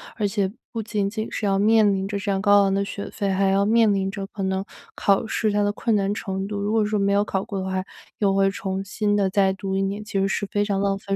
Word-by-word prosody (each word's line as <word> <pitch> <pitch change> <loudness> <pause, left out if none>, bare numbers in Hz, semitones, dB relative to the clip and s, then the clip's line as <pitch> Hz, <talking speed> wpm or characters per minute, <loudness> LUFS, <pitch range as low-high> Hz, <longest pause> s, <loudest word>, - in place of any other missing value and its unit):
而 210 -3 0
且 195 -1 -1 0.2
不 225 - -3
仅 205 -2 -1
仅 215 +1 -4
是 210 - -3
要 195 -1 +2
面 215 -1 +4
临 190 0 -2
着 200 0 -3
这 200 0 -2
样 195 0 0
高 205 -1 +5
昂 195 0 +1
的 200 0 +1
学 200 - -6
费， 200 -2 -2
还 195 +1 +2
要 195 +1 +3
面 220 -1 +4
临 195 0 0
着 200 -2 -5
可 200 -1 -6
能 190 0 -1 0.3
考 200 +1 +2
试 215 -1 0
它 205 0 +1
的 205 - +1
困 225 0 0
难 200 0 +1
程 190 -2 -4
度。 205 0 -4
如 205 +1 -1
果 220 -1 +2
说 210 0 0
没 200 0 +2
有 205 +1 +3
考 195 -1 -2
过 195 -2 -5
的 190 - -3
话， 190 0 -1 0.4
又 200 -2 +2
会 195 0 +3
重 195 -1 -3
新 205 +1 -1
地 195 -2 +2
再 195 -1 +3
读 190 0 -4
1 195 - +1
年， 200 +2 -2
其 205 -2 -2
实 195 - +2
是 205 - -1
非 205 +1 0
常 200 -2 -1
浪 195 0 +1
费 195 0 -3
200 Hz, 300 characters per minute, -23 LUFS, 195-205 Hz, 0.4 s, 高